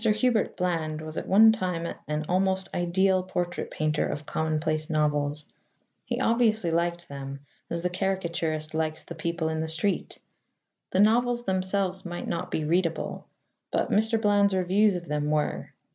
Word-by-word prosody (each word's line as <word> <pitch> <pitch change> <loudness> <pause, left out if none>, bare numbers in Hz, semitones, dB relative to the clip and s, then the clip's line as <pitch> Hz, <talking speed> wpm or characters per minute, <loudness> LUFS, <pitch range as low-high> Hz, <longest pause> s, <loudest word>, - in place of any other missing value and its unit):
Hubert 220 0 +2
Bland 165 -4 -1
was 155 0 -7
at - - -4
one 220 +3 +7
time 180 -6 -2 0.2
an 150 +1 -2
almost 190 +1 +1
ideal 185 +2 +2
portrait 180 -1 -3
painter 155 -1 0
of 145 - -4
commonplace 155 0 -1
novels. 150 -1 0 0.6
He - - -2
obviously 220 -6 +2
liked 170 +1 -1
them, 140 0 -7 0.3
as 170 0 -3
the 180 - +1
caricaturist 170 -5 -2
likes 160 0 -1
the - - -8
people 170 0 -2
in 160 0 -1
the 160 - -1
street. 165 +5 -1 0.7
The 185 - 0
novels 240 +3 +3
themselves 190 -1 0
might 175 -1 -5
not - - -3
be 155 - -1
readable, 165 0 -1 0.4
but - - 0
Mr. 220 +2 +2
Bland's 205 -2 +3
reviews 190 +3 +3
of 175 -1 -5
them 150 0 -1
were. 150 0 -1
175 Hz, 155 wpm, -27 LUFS, 155-195 Hz, 0.7 s, one